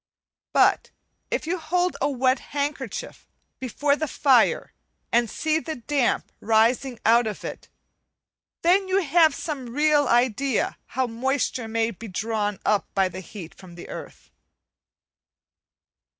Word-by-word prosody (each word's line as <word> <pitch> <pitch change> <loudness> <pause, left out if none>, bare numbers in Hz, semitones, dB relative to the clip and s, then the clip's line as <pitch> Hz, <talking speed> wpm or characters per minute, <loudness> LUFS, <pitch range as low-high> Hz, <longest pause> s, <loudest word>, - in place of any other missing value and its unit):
But - - +3 0.4
if - - -2
you 350 +3 -2
hold 355 +3 0
a - - +2
wet 260 -1 +2
handkerchief 280 -5 -5 0.3
before 280 +3 0
the 315 +1 -2
fire 265 -5 +3 0.4
and 235 -1 +3
see 315 +6 0
the 320 0 -5
damp 260 +1 0
rising 230 +3 +2
out 230 +1 +5
of 210 - -5
it, - - -7 0.9
then 375 +3 +4
you 380 +1 +2
have 320 -1 +4
some 275 -7 -5
real 295 -1 +3
idea 245 +1 +1 0.2
how 260 - +3
moisture 250 0 -1
may 225 0 0
be 230 +2 -10
drawn 210 +1 -2
up 210 -1 +2
by 190 -1 +3
heat 185 -1 -9
from 180 -3 -14
the 175 - -10
earth. - - -10
255 Hz, 130 wpm, -24 LUFS, 225-295 Hz, 0.9 s, out